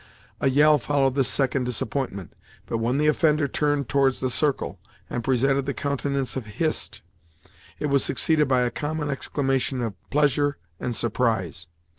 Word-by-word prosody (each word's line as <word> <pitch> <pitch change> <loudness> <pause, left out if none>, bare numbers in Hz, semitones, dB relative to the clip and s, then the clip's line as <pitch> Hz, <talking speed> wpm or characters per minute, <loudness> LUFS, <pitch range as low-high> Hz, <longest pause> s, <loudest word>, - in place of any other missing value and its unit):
A 135 - +2
yell 150 +2 +5
followed 135 0 +1
this 135 -2 +1
second 135 -1 +1
disappointment, 125 - -3 0.3
but 115 - -2
when 120 +4 0
the 150 - +2
offender 150 -1 +3
turned 145 -1 0
towards 135 -2 +2
the 130 -1 -1
circle, 145 +1 0 0.3
and 120 - -2
presented 135 +2 +1
the 140 - -2
countenance 140 -2 -1
of 130 -5 -4
Hist, 160 -2 -2 0.7
it - - -3
was 140 -2 +2
succeeded 155 -3 +2
by 130 -2 +3
a 125 0 0
common 150 -1 -3
exclamation 135 -1 -1
of 115 -3 -2 0.2
pleasure 145 0 +2 0.2
and 120 - -3
surprise. 110 - -1
135 Hz, 155 wpm, -25 LUFS, 125-145 Hz, 0.7 s, yell